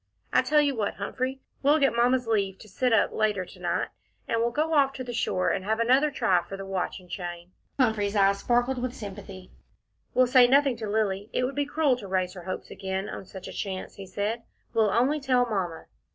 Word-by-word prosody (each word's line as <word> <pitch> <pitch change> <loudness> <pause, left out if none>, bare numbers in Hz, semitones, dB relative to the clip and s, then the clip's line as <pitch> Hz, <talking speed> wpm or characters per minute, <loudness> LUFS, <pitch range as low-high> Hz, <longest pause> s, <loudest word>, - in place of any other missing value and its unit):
I - - +6
tell 300 0 +3
you 285 -2 +1
what, 210 -3 -1
Humphrey, 255 +6 -3 0.2
we'll 290 +3 +4
get 275 -6 +2
Mamma's 245 +1 +3
leave 200 -4 0
to 215 - -14
sit 250 +5 0
up 225 - +3
later 210 -4 0
to - - -15
night, - - -1 0.4
and 230 - 0
we'll 235 - +2
go 310 +6 -1
off 275 -3 +4
to 265 - -5
the 245 -1 -6
shore 185 -5 0
and 190 - -2
have 220 +3 0
another 260 +6 +4
try 185 -10 +2
for 195 +3 -8
the 195 - -6
watch 195 0 -3
and 180 - -17
chain." 175 0 -6 0.3
Humphrey's 220 -5 +2
eyes 200 0 +4
sparkled 245 +2 +1
with 255 0 -3
sympathy. 195 -4 -9 0.6
"We'll 255 - +6
say 250 0 +6
nothing 275 0 +4
to 220 -2 -5
Lilly 205 -1 0
it - - +1
would 255 +2 -1
be 285 +1 -1
cruel 290 -3 +2
to 210 -5 -8
raise 185 -1 0
her 180 -2 -10
hopes 185 - -5
again 190 +1 -4
on - - -7
such 190 -1 -9
a - - -8
chance," 190 0 -5
he 195 -1 -8
said. 205 +5 -2 0.3
"We'll 220 -2 +3
only 255 +8 +2
tell 255 -3 +2
Mamma." 190 -8 -3
220 Hz, 225 wpm, -27 LUFS, 195-255 Hz, 0.6 s, I